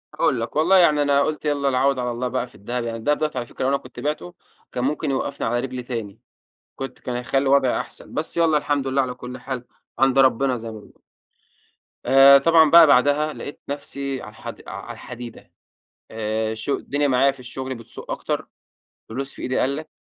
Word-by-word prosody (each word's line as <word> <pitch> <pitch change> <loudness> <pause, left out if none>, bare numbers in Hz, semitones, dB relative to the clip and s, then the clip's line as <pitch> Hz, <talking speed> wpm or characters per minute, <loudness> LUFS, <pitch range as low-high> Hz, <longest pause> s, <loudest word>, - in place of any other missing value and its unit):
هاقول 120 - +1
لك، 115 - -5
والله 170 +6 +5
يعني 155 -5 +5
أنا 140 -1 +3
قلت 155 0 -3
يالّا 145 -2 +1
العوض 135 0 +2
على 125 -1 -1
الله 120 +2 -2
بقى 125 0 -2
في - - -21
الدهب، 120 +4 -4
يعني 115 -1 -4
الدهب 145 +7 +1
دوّة 155 -1 -1
على 120 -1 -2
فكرة - - -6
لو 130 - +2
أنا 140 - +2
كنت - - -12
بعته 115 -13 -3 0.4
كان 125 - -3
ممكن 145 +1 -1
يوقفني 130 - -2
على 120 +1 0
رجلي 130 -1 -4
تاني، 115 -5 -6 0.6
كنت 135 -1 -7
كان 125 - -4
هيخلي 135 +2 0
وضعي 135 -2 +3
أحسن، - - -9
بس 160 +2 -3
يالّا 160 -2 +4
الحمد 145 -2 -1
لله 135 +1 +2
على 130 -1 -2
كل 125 0 -8
حال 125 -1 -6 0.3
عند 135 0 +4
ربنا 130 0 +3
زي 115 -1 -7
ما 110 - -9
بنقول. - - -19 1.0
آآ، 135 +2 +8
طبعًا 160 +2 +5
بقى 170 -2 +9
بعدها 145 +3 +3
لقيت 145 - -8
نفسي 140 -1 -4
على - - -9
الحد 110 - -9
على - - -7
الحديدة 120 -1 -10 0.6
آآ، 110 0 -2
الش 110 +4 -6
الدنيا 145 +1 0
معايا 135 +1 +4
في 135 - -16
الشغل 130 +1 -6
بتسوء 115 -2 -10
أكتر، - - -3 0.6
فلوس 135 +4 -4
في - - -11
إيدي 130 - -1
قلّت، 145 +4 -1
135 Hz, 200 wpm, -22 LUFS, 125-145 Hz, 1.0 s, بقى